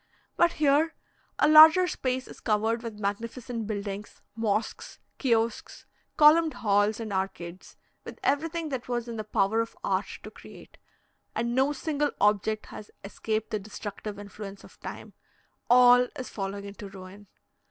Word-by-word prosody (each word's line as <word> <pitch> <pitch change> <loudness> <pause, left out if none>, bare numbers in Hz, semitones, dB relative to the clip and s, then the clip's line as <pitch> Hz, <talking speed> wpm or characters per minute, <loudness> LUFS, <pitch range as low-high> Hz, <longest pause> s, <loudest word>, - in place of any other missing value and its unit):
But 345 0 +3
here 305 +2 +2 0.4
a - - +4
larger 315 +4 +9
space 255 -5 -2
is - - -12
covered 225 +1 0
with 230 -3 -7
magnificent 225 +3 -4
buildings, 205 -1 -6
mosques, 220 -1 -2 0.2
kiosks, 230 -4 -1 0.3
columned 315 +1 +6
halls, 205 +1 +1
and 220 -3 -5
arcades, 190 -2 -5 0.3
with - - -10
everything 320 +3 0
that 260 -3 -5
was 240 -1 -2
in 230 -1 -6
the 215 - -3
power 215 +1 +1
of 230 - -6
art - - 0 0.2
to - - -9
create; - - -15 0.6
and 235 0 -1
no 265 +3 +2
single 295 0 -1
object 210 +1 +1
has 210 - -10
escaped 215 +2 -3
the 215 - -1
destructive 205 0 -7
influence 200 0 -9
of - - -17
time - - -9 0.6
all 245 0 +7
is 255 - -6
falling 200 0 -5
into 200 0 -9
ruin. 195 +1 -12
225 Hz, 145 wpm, -27 LUFS, 205-260 Hz, 0.6 s, larger